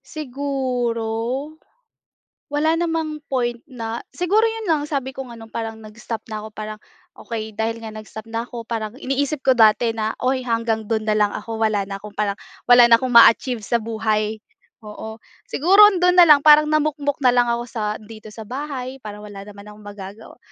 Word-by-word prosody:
siguro 260 Hz, -4 st, -3 dB, 1.5 s
wala 315 Hz, +2 st, +2 dB
namang 320 Hz, -3 st, -2 dB
point 240 Hz, -1 st, -1 dB
na 235 Hz, -5 st, -6 dB
siguro 390 Hz, +5 st, +2 dB
yun 450 Hz, -3 st, -2 dB
lang 305 Hz, -3 st, +1 dB
sabi 270 Hz, -3 st, -4 dB
ko 270 Hz, -, -5 dB
nga 235 Hz, -2 st, -11 dB
'no, 225 Hz, -, -11 dB
parang 225 Hz, 0 st, -5 dB
nag-stop 220 Hz, +1 st, -7 dB
na 215 Hz, -1 st, -6 dB
ako 220 Hz, -, -7 dB
parang 215 Hz, 0 st, -6 dB, 0.4 s
okey 220 Hz, -2 st, -6 dB
dahil 225 Hz, +1 st, -2 dB
nga 225 Hz, -, -7 dB
nag-stop 215 Hz, 0 st, -10 dB
na 230 Hz, +1 st, -3 dB
ako 235 Hz, -1 st, -9 dB
parang 220 Hz, -2 st, -3 dB
iniisip 275 Hz, +2 st, -2 dB
ko 260 Hz, -2 st, +3 dB
dati 225 Hz, +1 st, +4 dB
na, 220 Hz, 0 st, -1 dB
uy 255 Hz, 0 st, 0 dB
hanggang 230 Hz, -2 st, -1 dB
dun 220 Hz, 0 st, -2 dB
na 210 Hz, -, +2 dB
lang 210 Hz, -1 st, +2 dB
ako 225 Hz, +1 st, -6 dB
wala 215 Hz, -2 st, +1 dB
na 195 Hz, -, -4 dB
akong 205 Hz, +1 st, -11 dB
parang 205 Hz, -1 st, -2 dB, 0.3 s
wala 245 Hz, 0 st, +8 dB
na 230 Hz, -1 st, +6 dB
akong 255 Hz, -, -2 dB
ma-achieve 235 Hz, 0 st, +5 dB
sa 235 Hz, +2 st, 0 dB
buhay. 220 Hz, -1 st, -1 dB, 0.5 s
Oo, 220 Hz, +1 st, -8 dB, 0.3 s
siguro 375 Hz, +8 st, +3 dB, 0.2 s
dun 360 Hz, 0 st, +4 dB
na 350 Hz, -, +9 dB
lang 290 Hz, -2 st, +7 dB
parang 300 Hz, 0 st, +7 dB
namukmok 295 Hz, -2 st, 0 dB
na 250 Hz, -, +7 dB
lang 245 Hz, 0 st, +3 dB
ako 235 Hz, 0 st, -1 dB
sa 210 Hz, -3 st, -2 dB
dito 215 Hz, 0 st, -12 dB
sa 220 Hz, -, -8 dB
bahay 265 Hz, +1 st, -6 dB
parang 210 Hz, -2 st, -9 dB
wala 200 Hz, -1 st, -10 dB
naman 200 Hz, 0 st, -12 dB
akong 210 Hz, -, -16 dB
magagawa. 205 Hz, +2 st, -10 dB
230 Hz, 185 wpm, -21 LUFS, 215-270 Hz, 1.5 s, na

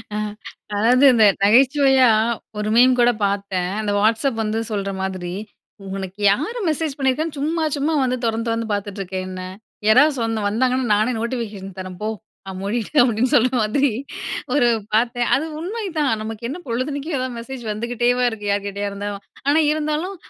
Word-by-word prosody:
அ -, -, -1 dB, 0.6 s
அதாவது 245 Hz, +6 st, +3 dB
இந்த 225 Hz, -3 st, +5 dB, 0.2 s
நகைச்சுவையா 265 Hz, +3 st, +5 dB, 0.5 s
ஒரு 210 Hz, 0 st, -2 dB
மீம் 250 Hz, +1 st, +5 dB
கூட 240 Hz, 0 st, +5 dB
பாத்தேன். 195 Hz, -2 st, -1 dB
அந்த 210 Hz, -, -1 dB
WhatsApp 225 Hz, +4 st, +2 dB
வந்து 215 Hz, +1 st, -1 dB
சொல்ற 200 Hz, -1 st, -2 dB
மாதிரி 185 Hz, -2 st, -4 dB, 0.6 s
''உனக்கு 190 Hz, 0 st, -6 dB
யாரு 330 Hz, -, -2 dB
மெசேஜ் 310 Hz, -2 st, -2 dB
பண்ணிருக்கான்னு 290 Hz, +3 st, -1 dB
சும்மா 320 Hz, +3 st, -1 dB
சும்மா 295 Hz, +3 st, 0 dB
வந்து 255 Hz, 0 st, 0 dB
தொறந்து 225 Hz, +1 st, -1 dB
தொறந்து 230 Hz, 0 st, -1 dB
பார்த்துட்டு 205 Hz, 0 st, -4 dB
இருக்க 190 Hz, 0 st, -7 dB
என்னை? 185 Hz, 0 st, -6 dB, 0.4 s
யாராவது 290 Hz, +7 st, +6 dB
சொன் 225 Hz, -1 st, -1 dB
வந்தாங்கன்னா 250 Hz, +2 st, +1 dB
நானே 215 Hz, +4 st, +1 dB
நோட்டிஃபிகேஷன் 220 Hz, -6 st, -5 dB
தரேன் 185 Hz, -1 st, -7 dB
போ! 215 Hz, -, -1 dB, 0.4 s
நான் 190 Hz, -1 st, -6 dB
மூடிட்டேன்'' 230 Hz, +7 st, +1 dB
அப்டின்னு 245 Hz, +1 st, +1 dB
சொல்ற 250 Hz, +1 st, +4 dB
மாதிரி 265 Hz, +7 st, +2 dB, 0.6 s
ஒரு 255 Hz, -4 st, +4 dB, 0.3 s
பாத்தேன். 240 Hz, +2 st, +1 dB
அது 295 Hz, +4 st, -1 dB
உண்மைதான். 355 Hz, -, -2 dB
நமக்கு 225 Hz, +1 st, -5 dB
என்ன 295 Hz, -, -4 dB
பொழுதன்னைக்கும் 280 Hz, +6 st, -2 dB
எதாவது 255 Hz, -1 st, -3 dB
மெசேஜ் 245 Hz, +1 st, -8 dB
வந்துகிட்டேவா 240 Hz, +3 st, 0 dB
இருக்கு? 210 Hz, -2 st, -8 dB
யார் 200 Hz, 0 st, -1 dB
கிட்டயா 200 Hz, 0 st, -3 dB
இருந்தாலும். 200 Hz, 0 st, -5 dB, 0.2 s
ஆனா 295 Hz, +3 st, +4 dB
இருந்தாலும், 310 Hz, +5 st, -2 dB
235 Hz, 155 wpm, -21 LUFS, 205-270 Hz, 0.6 s, யாராவது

